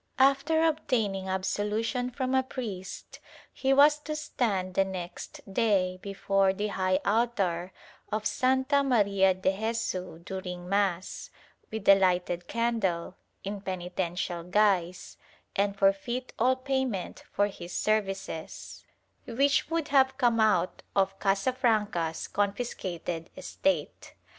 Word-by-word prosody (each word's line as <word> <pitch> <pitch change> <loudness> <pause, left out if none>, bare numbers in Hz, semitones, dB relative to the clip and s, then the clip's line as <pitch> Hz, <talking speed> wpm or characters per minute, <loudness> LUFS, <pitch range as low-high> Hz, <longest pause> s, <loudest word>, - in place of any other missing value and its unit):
After 275 +4 +3
obtaining 225 -12 0
absolution 210 +6 -1
from 255 +1 -2
a 265 - +4
priest 220 -8 -7 0.3
he 270 - 0
was 290 +2 +6
to 305 +1 -5
stand 205 -11 -1
the 195 - +3
next 185 -2 -7
day 190 -5 +2
before 195 -1 +1
the 210 +2 -2
high 185 -1 +1
altar 200 -6 0 0.4
of 215 0 -2
Santa 265 +2 +2
Maria 200 -7 +3
de 190 +1 0
Jesu 220 -6 -2
during 180 0 -6
mass, 195 -2 -1 0.4
with 220 -2 -6
a 200 - +10
lighted 180 -2 +1
candle, 220 -8 -1 0.3
in 200 0 -4
penitential 180 -2 -3
guise, 185 -2 +1 0.4
and 200 0 0
forfeit 200 +6 0
all 255 +3 +4
payment 260 -7 -2
for 205 - +2
his 180 -3 -7
services 195 -6 -2 0.2
— - - -42
which 280 +5 +2
would 330 -2 -1
have 265 -1 +4
come 235 -2 +3
out 215 -4 +2
of 195 0 +1
Casafranca's 205 -5 0
con 200 -1 0
fiscated 175 -7 -5
estate. 290 0 -2
200 Hz, 120 wpm, -28 LUFS, 185-245 Hz, 0.4 s, a